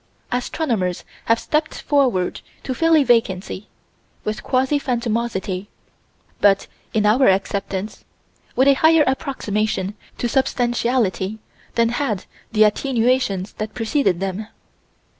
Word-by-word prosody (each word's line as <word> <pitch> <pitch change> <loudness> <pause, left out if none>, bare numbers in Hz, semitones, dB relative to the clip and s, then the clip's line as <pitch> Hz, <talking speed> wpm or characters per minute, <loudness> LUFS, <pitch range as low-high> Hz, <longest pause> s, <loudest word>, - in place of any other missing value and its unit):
Astronomers 245 - -1 0.2
have 230 - +4
stepped 310 +1 -1
forward 255 -11 +1 0.2
to 260 - -2
fill 330 +4 +3
a 305 - +5
vacancy 210 -5 0 0.6
with 215 0 -3
quasi 265 +3 +1
phantomosity 230 -6 -2 0.7
but, 195 -1 +4 0.3
in 215 -1 +1
our 245 +6 +5
acceptance, 195 +1 -1 0.5
with 260 +2 +4
a 280 - +8
higher 320 -1 +6
approximation 215 -7 -1 0.2
to 240 - -1
substantiality 240 -5 0 0.4
than 230 -1 +3
had 235 -6 -2 0.3
the 215 -1 +5
attenuations 225 -3 +1
that 215 0 -4
preceded 225 - +1
them. 195 +2 -3
230 Hz, 110 wpm, -21 LUFS, 200-260 Hz, 0.7 s, a